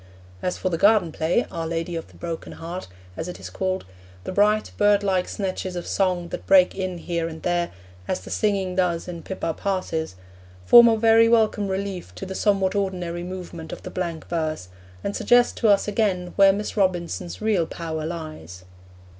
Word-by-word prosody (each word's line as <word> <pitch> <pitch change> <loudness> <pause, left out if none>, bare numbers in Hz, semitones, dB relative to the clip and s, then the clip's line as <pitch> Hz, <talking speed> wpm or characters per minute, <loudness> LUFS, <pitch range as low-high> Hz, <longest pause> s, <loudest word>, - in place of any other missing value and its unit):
As 180 - -2
for 185 - -1
the 165 -2 -2
garden 205 -5 +4
play, 165 +10 +1
Our 165 -1 -3
Lady 165 +1 -3
of 165 - -5
the - - -20
Broken 165 -1 -6
Heart, 170 +3 -7 0.3
as 160 - -4
it 180 - -7
is - - -8
called, 185 0 -2 0.4
the - - -5
bright, 210 +2 +2
birdlike 200 -3 +2
snatches 185 -2 -3
of 175 - -4
song 180 -3 0
that - - -7
break 185 -2 +6
in 185 -2 -3
here 170 -1 -2
and 160 -1 -8
there 175 -1 0 0.4
as - - -1
the - - -10
singing 195 -3 0
does 180 -2 0
in 170 -2 -6
Pippa 165 -2 -3
Passes 165 - -2 0.5
form 235 - +9
a 225 -1 +4
very 225 +1 +5
welcome 220 -3 +3
relief 190 -1 -4
to - - -6
the 190 - -5
somewhat 195 -1 +1
ordinary 180 -4 -2
movement 175 -2 -7
of - - -8
the - - -7
blank 170 -3 -4
verse, 155 - -2 0.3
and 200 - -2
suggest 245 0 +4
to 225 - +2
us 200 -1 +4
again 195 -4 0
where 195 -1 +7
Miss 205 +2 -4
Robinson's 180 -3 -1
real 210 -6 +1
power 160 -2 -5
lies. 155 - -7
185 Hz, 185 wpm, -24 LUFS, 170-200 Hz, 0.5 s, form